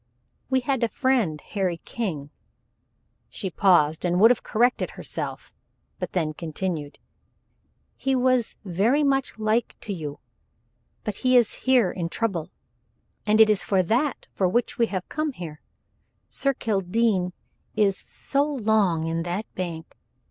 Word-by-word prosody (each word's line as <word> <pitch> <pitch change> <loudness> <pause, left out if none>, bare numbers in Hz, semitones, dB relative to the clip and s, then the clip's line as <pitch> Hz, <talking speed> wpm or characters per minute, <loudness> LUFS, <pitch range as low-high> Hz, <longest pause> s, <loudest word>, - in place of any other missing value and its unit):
"We 260 -1 +2
had 260 -1 0
a - - +4
friend, 235 - +1
Harry 185 0 -2
King," 155 -11 -4 1.0
she 190 -3 -4
paused 160 -5 +3
and 175 0 +1
would 225 +4 +8
have 250 - +1
corrected 245 +2 +1
herself, - - -5 0.5
but - - -4
then 160 -4 0
continued 160 -2 -4 1.0
"he 270 0 0
was 255 -2 +2
very 210 - +2
much 270 -4 +1
like 220 +2 0
to 210 - -4
you 150 -5 -6 0.8
but 210 -2 -4
he 255 0 +4
is 235 -3 +3 0.2
here 245 -7 +5
in 170 -3 -3
trouble, 185 -6 -2 0.8
and 215 +1 +4
it 220 - +9
is 210 -2 +3
for 190 -2 +2
that 250 - 0
for 185 -2 +1
which 240 +5 -1
we 230 - +4
have 185 -4 -4
come 305 -1 -2
here. 160 -8 -8 0.7
Sir 275 -1 0
Kildene 195 -3 0 0.4
is 205 -3 +3
so 280 +7 -1
long 215 - +1
in 165 0 -1
that 175 +5 -3
bank! 170 -3 -5
205 Hz, 140 wpm, -25 LUFS, 175-240 Hz, 1.0 s, it